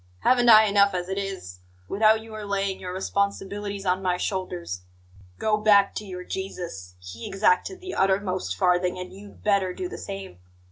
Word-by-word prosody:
Haven't 245 -1 +4
I 220 -1 +10
enough 200 -1 +4
as 180 0 -3
it 190 +1 -1
is, 190 - -6 0.3
without 220 +2 +3
your 215 -1 -8
laying 200 -1 -1
your 180 - -6
responsibilities 200 +1 -2
on 185 +1 +1
my 180 -1 0
shoulders? 180 - -3 0.6
Go 215 - +1
back 205 -2 +5
to 215 - -5
your 180 -2 -7
Jesus; 170 - -6
he 90 +6 -8
exacted 195 - +1
the 370 0 -6
uttermost 190 - 0
farthing, 180 - +2
and 180 0 -7
you'd 200 +1 -13
better 195 -3 +2
do 365 - -3
the - - -8
same. 195 - -7
195 Hz, 170 wpm, -25 LUFS, 180-205 Hz, 0.6 s, I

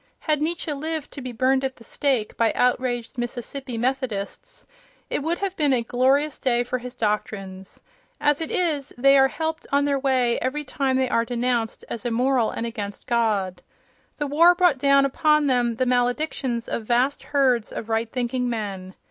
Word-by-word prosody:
Had 305 -2 0
Nietzsche 320 -1 -1
lived 310 +1 -4
to 280 - -8
be 255 -1 -5
burned 260 +3 +1
at 265 -1 -2
the 230 - -16
stake 255 -4 -1
by 230 -2 +2
outraged 245 -1 0
Mississippi 245 +1 -4
Methodists, 255 - -3 0.5
it - - 0
would 330 +4 -1
have 390 -1 -3
been 295 -5 +2
a 240 -2 +1
glorious 265 +5 +1
day 240 -2 +1
for 250 +1 -3
his 250 +1 -8
doctrines. 200 -4 -3 0.4
As 295 +1 +2
it 320 - -3
is, 300 -6 -1
they 275 +2 +5
are 270 -1 +6
helped 320 +3 -4
on 280 0 +3
their 280 -1 +1
way 255 -3 +2
every 280 +4 -2
time 265 -1 -1
they 260 0 +2
are 230 -2 +2
denounced 240 -1 -1
as 235 - -5
immoral 245 0 +1
and 230 - -4
against 205 -4 -6
God. 210 -6 0 0.6
The 295 - -1
war 330 +5 +5
brought 350 -7 +3
down 275 0 +4
upon 300 +2 +2
them 245 -3 +2
the 255 - 0
maledictions 245 0 0
of 225 - -3
vast 250 +5 +1
herds 265 -6 +2
of 220 - -6
right 225 0 -1
thinking 250 0 -1
men. 195 -5 -5
255 Hz, 180 wpm, -24 LUFS, 235-280 Hz, 0.6 s, are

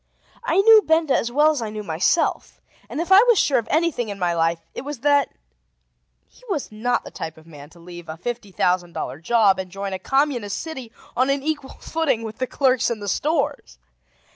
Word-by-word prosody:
I 475 - 0
knew 440 +1 +8
Benda 320 -5 +2
as 235 - -1
well 300 +4 +4
as 295 -5 -3
I 220 - -3
knew 210 0 -6
myself, 175 - 0 0.3
and - - -5
if 340 +3 -3
I 385 +2 +9
was 475 -3 +5
sure 280 - +3
of 230 - -7
anything 305 -8 0
in 200 - -5
my 175 -2 0
life, 165 0 +1 0.2
it - - -5
was 280 -2 -7
that 285 -1 +3 1.0
he - - -24
was 310 - -3
not 225 +3 -1
the - - -10
type 160 0 -7
of 160 - -17
man 145 -3 -13
to 170 - -19
leave 175 -1 -11
a 160 - -6
fifty 230 +2 -5
thousand 180 -1 0
dollar 130 +4 -5
job 205 +1 +3
and 185 -1 -5
join 195 +1 -5
a 190 - -4
communist 260 -3 0
city 265 -8 -7 0.2
on 255 +2 +2
an 275 0 0
equal 290 -3 -4
footing 315 -8 -1
with 220 +1 -7
the 255 - -1
clerks 260 -3 +2
in 235 -2 -3
the 205 - -7
stores. 275 - -1
235 Hz, 215 wpm, -22 LUFS, 185-290 Hz, 1.0 s, I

